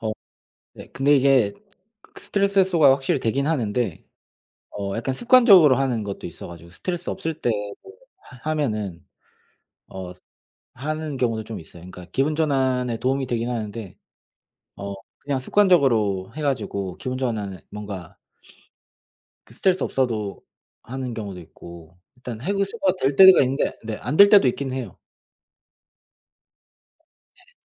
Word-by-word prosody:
어 110 -1 -2 0.6
네, - - -12
근데 145 +2 +3
이게 130 -6 +3 0.5
그 - - -16
스트레스 200 0 0
해소가 175 -7 +5
확실히 135 +2 0
되긴 135 +5 0
하는데 120 - -1 0.7
어 100 0 -3
약간 125 +3 -2
습관적으로 210 - +6
하는 130 -4 0
것도 100 -1 -6
있어 85 - -9
가지고 85 0 -12
스트레스 175 - -4
없을 165 -4 -4
때 120 - +1 0.3
뭐 390 - -13 0.4
하 125 +5 -6
하면은 105 - -3 0.8
어 95 -1 -8 0.6
하는 155 +2 -4
경우도 115 -3 -1
좀 110 0 -7
있어요. 85 +1 -13
그니까 90 0 -11
기분 140 +3 0
전환에 130 -6 0
도움이 135 +3 -1
되긴 120 -1 -2
하는데 110 -4 -5 0.8
어 100 0 -6 0.3
그냥 140 -2 -2
습관적으로 130 - +2
해 155 - -5
가지고 100 -9 -2
기분 130 -1 -4
전환을 105 -8 -3
뭔가 100 -5 -8 1.3
그 - - -18
스트레스 190 -1 +1
없어도 110 -6 -2 0.4
하는 130 -1 -5
경우도 100 -5 -6
있고 85 +1 -14 0.2
일단 125 -3 -8
해소가 195 - 0
될 135 +1 +1
때가 190 +2 +9
있는데 135 +1 0
네 110 -1 -4
안 150 - -3
될 200 0 +9
때도 200 -9 +6
있긴 130 +1 -2
해요. 130 -1 -6 2.4
네. - - -24
130 Hz, 285 characters per minute, -23 LUFS, 105-150 Hz, 2.4 s, 때가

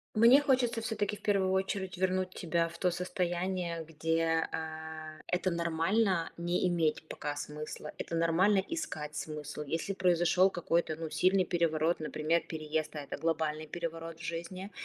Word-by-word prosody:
Мне 235 +6 +8
хочется 250 -5 +2
всё-таки 215 -2 -1
в - - -15
первую 195 -2 +2
очередь 190 0 -1
вернуть 185 0 +1
тебя 170 -1 0
в 170 +1 -10
то 180 +1 +2
состояние, 175 -1 -2
где, 165 +1 +1
а, 155 -1 -6
это 180 +1 +1
нормально- 170 +2 +1
не 175 +2 +1
иметь 165 -3 +1
пока 145 0 -4
смысла, 150 +1 -6
это 165 - -3
нормально- 185 +5 +4
искать 155 - -4
смысл. 150 -1 -5
Если 165 +6 -2
произошёл 180 0 +4
какой-то, 170 -3 0
ну, 165 -1 -4
сильный 185 +2 +3
переворот, 165 -1 +1
например, 155 +2 +1
переезд, 155 -1 -3
а - - -2
это - - -5
глобальный 155 -1 -1
переворот 165 0 -5
в - - -11
жизни. 170 +4 -5
170 Hz, 150 wpm, -32 LUFS, 160-185 Hz, -, Мне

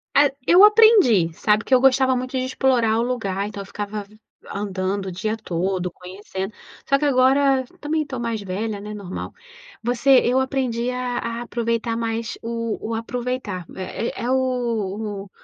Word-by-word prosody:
Ah 285 0 +6 0.2
eu 355 +6 +6
aprendi, 420 - +6
sabe, 210 +6 +1
que 265 - -1
eu 255 - +7
gostava 260 0 +4
muito 255 +1 -4
de 255 - 0
explorar 250 -4 +2
o - - +2
lugar, 205 -5 -2
então 205 -1 -7
eu - - -8
ficava 205 +1 -5
an 200 - -13 0.4
andando 195 -1 -2
o 190 - -4
dia 215 +5 -2
todo 180 -2 -2
conhecendo. 190 +2 -7 0.4
Só 275 - +5
que 300 - 0
agora 270 0 +4 0.2
também 305 +1 -1
tô 265 -4 -6
mais 230 -2 -2
velha, 200 +2 -4
né, 210 +1 -7
normal. 200 -3 -6 0.5
Você 245 +3 0 0.2
eu 250 +2 +3
aprendi 255 -3 -1
a 250 -1 -2
a 230 0 -4
aproveitar 230 -1 -2
mais 230 0 -3
o 230 -1 -3
o - - -2
aproveitar 230 -5 -3
é 190 +6 -4
é 245 - -1
o 225 -6 -1
o 200 - -15
230 Hz, 170 wpm, -22 LUFS, 205-255 Hz, 0.5 s, eu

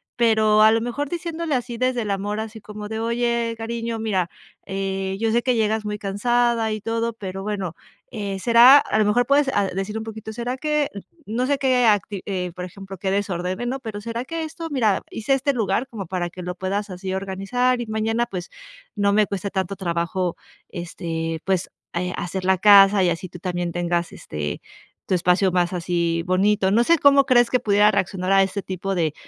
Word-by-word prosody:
pero, 220 -2 +4
a 220 0 +7
lo 225 0 +2
mejor 245 +5 -3
diciéndole 335 -3 -3
así 245 -1 -3
desde 255 0 0
el 205 - -3
amor, 205 +2 -2
así 220 0 -7
como 210 0 -8
de: 220 0 -3
"Oye, 235 0 0
cariño, 230 0 -4
mira, 190 -6 0 0.4
eh, 195 0 -3
yo 225 0 +1
sé 235 - +2
que 250 -1 +2
llegas 220 -1 0
muy 210 0 -3
cansada 230 +3 +1
y 215 - -5
todo", 230 +1 -1
pero 195 -3 -6
bueno, 195 -5 -3 0.4
eh, 200 -4 -4
"Será", 240 +5 +8
a 215 - 0
lo 215 - +4
mejor 240 +4 +3
puedes 280 +1 +3
a 200 - +3
decir 195 +3 -4
un 220 - -4
poquito, 220 0 -7
"Será 240 +3 -3
que" 300 0 0 0.4
no 235 +4 -1
sé, 285 0 +2
qué 255 -2 +2
acti 205 -2 +1
eh, 180 -3 -3
por 180 +1 -6
ejemplo, 195 +1 -10
qué 190 +1 -2
desordene, 190 +1 -2
¿no?, 260 +3 -2
pero, 220 -5 -6
"Será 230 +3 -4
que 330 +3 -4
esto, 330 +1 -6
mira, 225 -9 +1
hice 225 +5 -1
este 275 +1 0
lugar 230 +1 0
como 215 -6 -7
para 175 0 -3
que 180 - -10
lo 180 - -4
puedas 200 +3 -3
así 185 +1 -5
organizar 195 +7 0
y - - -3
mañana, 220 +2 0
pues, 185 -6 -6 0.5
no 200 0 +2
me 210 +1 +4
cueste 200 0 -4
tanto 190 0 -2
trabajo, 175 0 -1 0.3
este, 165 -2 -4
pues, 190 -1 0 0.2
eh, 180 +1 -2
hacer 185 +1 -4
la 190 0 +3
casa, 200 0 +7
y 175 - +3
así 175 +2 -3
tú 175 - -11
también 175 -1 -3
tengas, 175 0 -1
este, 75 -1 -5 0.4
tu 185 - +1
espacio 180 +2 +2
más 175 -1 +2
así, 170 -1 -1
bonito", 190 +1 +2
no 230 +3 +4
sé, 335 +7 +4
cómo 280 -1 +6
crees 240 -3 +4
que 250 - +2
pudiera 205 -1 +4
reaccionar 190 -1 0
a 195 0 +6
este 195 +1 -3
tipo 190 +1 -4
de 160 -4 0
210 Hz, 205 wpm, -22 LUFS, 185-235 Hz, 0.5 s, Será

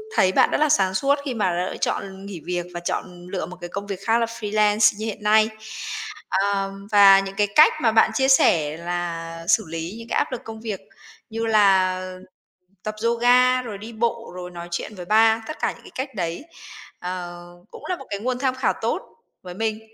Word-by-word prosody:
thấy 185 - +4
bạn - - +4
rất - - +2
là 305 0 +2
sáng 190 -9 +3
suốt 275 +8 +2
khi 260 - -2
mà 180 -5 0
lựa - - -6
chọn 195 0 -3
nghỉ 195 -4 -7
việc 175 -1 -2
và 175 - -4
chọn 175 0 -5
lựa 185 -1 -3
một 180 - -10
cái 175 - -5
công 200 +2 -5
việc 195 -2 -4
khác 225 0 +3
là 230 - +2
freelance 210 -1 +2
như 215 - -4
hiện 215 -1 -5
nay. 215 +1 +4 0.8
À, 195 0 +1 0.2
và 200 -2 +8
những 195 0 -5
cái 205 0 +2
cách 310 - +8
mà 225 - +3
bạn 220 0 +4
chia 265 +3 +2
sẻ 160 - +4
là 165 -1 -4
xử 220 - +3
lý 165 +4 -5
những 230 - -10
cái - - 0
áp - - 0
lực 255 - -4
công 220 -2 -9
việc 215 -4 -4 0.5
như 225 +1 -3
là 195 -4 +4 0.8
tập 215 0 -4
yoga, 245 +2 +4
rồi 225 -5 -7
đi 220 +4 -9
bộ, 230 +1 -2
rồi 180 0 -7
nói 175 0 -8
chuyện 190 +5 -4
với 180 -2 -8
ba, 220 +3 +4
tất 310 - -6
cả - - 0
những - - -15
cái - - -13
cách 260 -2 -4
đấy, 170 +3 -3 0.6
ờ, 175 -1 -6 0.3
cũng - - -12
là 365 - 0
một 270 - -11
cái 200 - -3
nguồn 250 +3 -2
tham 260 -1 0
khảo 260 - +1
tốt - - -1 0.4
với 180 -1 -8
mình, 220 +2 -2
205 Hz, 215 wpm, -23 LUFS, 180-230 Hz, 0.8 s, và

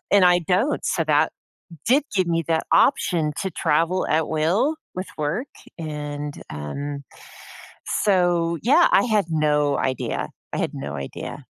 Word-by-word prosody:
and 200 -2 +6
I 180 0 +6
don't, 190 - +1
so - - 0
that - - +2 0.5
did 275 +5 +4
give 185 -2 +2
me 165 -1 0
that 160 -1 +1
option 170 - +3
to 190 - -2
travel 165 +2 +1
at 160 0 +1
will 175 - +1 0.2
with 185 +1 -4
work, 165 - -2 0.3
and, 150 -2 -5 0.2
um, 140 - -5 1.0
so, 175 -4 +2
yeah, 295 +8 +5
I - - +5
had 215 -5 +2
no 150 -2 +2
idea. 130 -1 -2 0.2
I - - -1
had - - -1
no 70 0 -5
idea. 70 0 -7
165 Hz, 145 wpm, -23 LUFS, 150-190 Hz, 1.0 s, and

